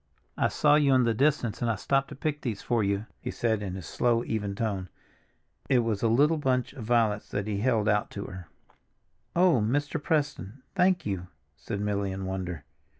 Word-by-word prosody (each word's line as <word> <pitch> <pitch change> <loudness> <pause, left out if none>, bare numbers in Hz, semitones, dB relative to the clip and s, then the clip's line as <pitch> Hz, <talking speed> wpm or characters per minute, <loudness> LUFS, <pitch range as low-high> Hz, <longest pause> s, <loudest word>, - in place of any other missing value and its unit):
"I - - +2
saw 150 0 +4
you 140 -3 +4
in 130 - +4
the 115 -1 +2
distance 135 -3 +1
and 120 - +1
I 115 - +1
stopped 135 +6 +1
to - - -9
pick 150 +2 -2
these 110 -5 -4
for 120 -3 +1
you," 100 +1 0
he - - -5
said 110 -3 0
in 95 -3 -4
his 95 -3 -7
slow, 120 -1 +1
even 105 -4 -2
tone. 100 -4 -2 0.8
It 125 -2 +4
was 110 -3 -1
a 115 - +3
little 145 +8 +3
bunch 130 -3 0
of 125 -6 -8
violets 110 -3 +1
that 100 -1 -2
he 105 -2 -2
held 110 -2 +1
out 105 -1 +2
to 100 - -4
her. 90 -4 -9 0.9
"Oh, 175 -8 +4
Mr. 145 +7 0
Preston, 140 - -2
thank 180 -2 +2
you!" 95 -3 -3 0.3
said 100 +6 -5
Milly 100 -1 -1
in 95 0 -4
wonder. 90 -4 -4
115 Hz, 200 wpm, -28 LUFS, 100-135 Hz, 0.9 s, saw